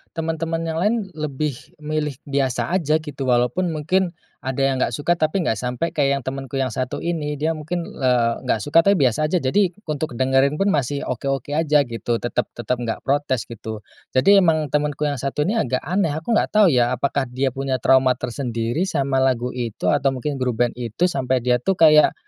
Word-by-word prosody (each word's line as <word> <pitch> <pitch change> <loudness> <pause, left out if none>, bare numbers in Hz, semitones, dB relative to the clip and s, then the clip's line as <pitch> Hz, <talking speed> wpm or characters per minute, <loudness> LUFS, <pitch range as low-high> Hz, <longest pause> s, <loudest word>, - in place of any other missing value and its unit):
teman-teman 165 0 -2
yang 165 0 -2
lain 210 +6 +2 0.2
lebih 150 -2 -2 0.2
milih 150 -2 -3
biasa 135 -1 -1
aja 155 -4 +2
gitu 145 -3 -8
walaupun 125 +9 +2
mungkin 170 +4 0 0.3
ada 130 +1 -3
yang 135 -1 0
nggak - - +2
suka 160 +4 +1
tapi 160 +4 +1
nggak - - +2
sampai 125 +6 -2
kayak 140 -2 +2
yang 135 - -7
temenku 135 0 -5
yang 130 -3 0
satu 130 +1 -3
ini, 155 -3 -2
dia 155 +3 0
mungkin, 165 +2 -3
eee, 125 -6 +1
nggak 110 - +1
suka 145 +3 +4
tapi 200 +4 +4
biasa 140 0 +2
aja 170 -2 0
jadi 180 +6 +2 0.2
untuk 150 -4 -3
dengerin 135 +3 +2
pun 195 +4 +1
masih 140 0 -1
oke-oke 135 +2 -3
aja 150 -1 +3
gitu 115 -1 -3
tetap 120 +1 -2
tetap 120 +1 -2
nggak 115 -2 -4
protes 135 -3 0
gitu. 110 -2 -8 0.3
Jadi 195 +10 +6
emang 155 -5 +2
temanku 150 0 0
yang 145 -3 -1
satu 140 +3 -1
ini 195 - 0
agak 130 +1 -1
aneh, 170 -2 0
aku 165 +9 -4
nggak 220 - +3
tahu 205 -6 +6
ya 125 0 +2
apakah 140 +1 -1
dia 130 +2 -1
punya 135 0 -2
trauma 130 0 +4
tersendiri 120 +5 -2
sama 135 -4 0
lagu 125 -2 +1
itu, 120 -6 -5
atau 135 +4 +1
mungkin 135 +2 -3
grup 125 -2 +1
band 120 - -1
itu 125 +10 0
sampai 130 -3 0
dia 125 -1 +2
tuh 190 +9 0
kayak, 155 -2 +6
140 Hz, 195 wpm, -21 LUFS, 125-155 Hz, 0.3 s, Jadi